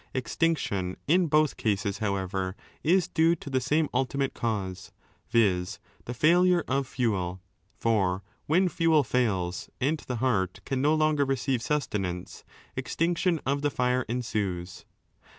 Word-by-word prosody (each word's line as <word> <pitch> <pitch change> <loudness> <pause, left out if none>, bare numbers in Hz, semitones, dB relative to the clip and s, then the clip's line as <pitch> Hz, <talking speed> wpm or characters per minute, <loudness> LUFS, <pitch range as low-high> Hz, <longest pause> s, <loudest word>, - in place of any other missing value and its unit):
Extinction 125 - -1
in 175 +3 +4
both 155 -1 +2
cases, 100 -2 -1
however, 95 -2 -2 0.3
is 175 +3 +3
due 165 +1 +3
to 145 -3 -9
the 130 -1 +1
same 150 +4 +2
ultimate 135 +1 0
cause, 95 -5 -3 0.4
viz. 100 -6 +2 0.3
the 120 - -4
failure 175 +5 +4
of 135 0 0
fuel, 95 -9 -1 0.4
for 100 -5 +1 0.2
when 180 +5 +4
fuel 165 -3 +3
fails 95 -9 -1
and 145 +5 +1
the 125 - -5
heart 105 -7 0
can 135 -1 -1
no 150 +3 +3
longer 155 -2 +2
receive 135 -2 0
sustenance, 100 -10 -2 0.3
extinction 170 0 0
of 140 +1 0
the 145 - +2
fire 125 -1 +1
ensues. 100 -7 -3
125 Hz, 135 wpm, -28 LUFS, 100-150 Hz, 0.4 s, in